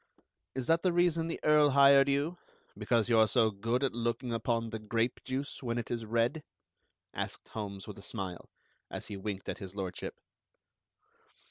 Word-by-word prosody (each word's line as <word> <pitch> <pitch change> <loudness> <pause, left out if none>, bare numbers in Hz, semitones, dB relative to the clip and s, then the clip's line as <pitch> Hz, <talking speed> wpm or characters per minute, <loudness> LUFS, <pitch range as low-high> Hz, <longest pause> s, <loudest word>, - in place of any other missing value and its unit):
"Is 130 -2 -2
that 165 +4 +3
the 185 - +2
reason 170 -2 +2
the 165 - -4
Earl 150 -1 +5
hired 140 0 +6
you, 145 +6 0 0.4
because 110 +2 +1
you 115 -2 +4
are 110 - +6
so 110 +1 +3
good 115 +6 -1
at 135 - +1
looking 120 +1 -2
upon 115 0 -1
the 110 - -4
grape 115 +3 -1
juice 135 +2 -4
when 120 -2 -2
it 120 - -4
is 115 -2 -3
red?" 120 +7 +1 0.7
asked - - -5
Holmes 100 -3 -6
with 105 -2 -8
a - - -10
smile, 95 -5 -5 0.4
as - - -6
he 105 - -4
winked 100 -1 -5
at - - -4
His 95 0 -8
Lordship. 95 -2 -4
115 Hz, 175 wpm, -31 LUFS, 105-140 Hz, 0.7 s, hired